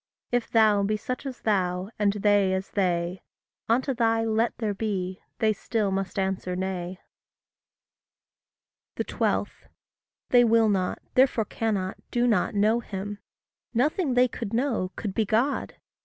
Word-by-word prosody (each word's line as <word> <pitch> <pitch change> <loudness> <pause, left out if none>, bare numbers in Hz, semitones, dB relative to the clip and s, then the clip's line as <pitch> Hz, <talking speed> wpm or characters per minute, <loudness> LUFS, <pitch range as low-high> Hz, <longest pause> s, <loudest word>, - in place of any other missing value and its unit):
If 245 -1 0
thou 215 -3 +4
be 210 +2 0
such 255 +6 -5
as 260 - -7
thou, 185 -2 0
and 205 -1 +3
they 205 -2 +3
as 190 +1 -4
they, 180 -2 0 0.5
Unto 260 +4 +2
thy 225 -2 +2
Let 225 +1 0
there 220 -3 -1
be, 195 -3 -3 0.2
they 220 -1 +2
still 210 0 -1
must 195 0 -2
answer 190 -1 -1
Nay. 185 -1 -3 2.0
12. - - -1 0.6
They 245 -1 +6
will 225 -1 +4
not, 185 -3 0 0.2
therefore 255 -4 +3
cannot, 200 -4 -2
do 240 0 +1
not 210 -5 +1
know 215 +3 +3
him. 205 -2 -6 0.6
Nothing 285 +2 +1
they 250 +1 +5
could 230 -3 -6
know, 230 -8 0
could 205 -4 -4
be 220 - +1
God. 230 +7 0
210 Hz, 140 wpm, -26 LUFS, 190-230 Hz, 2.0 s, They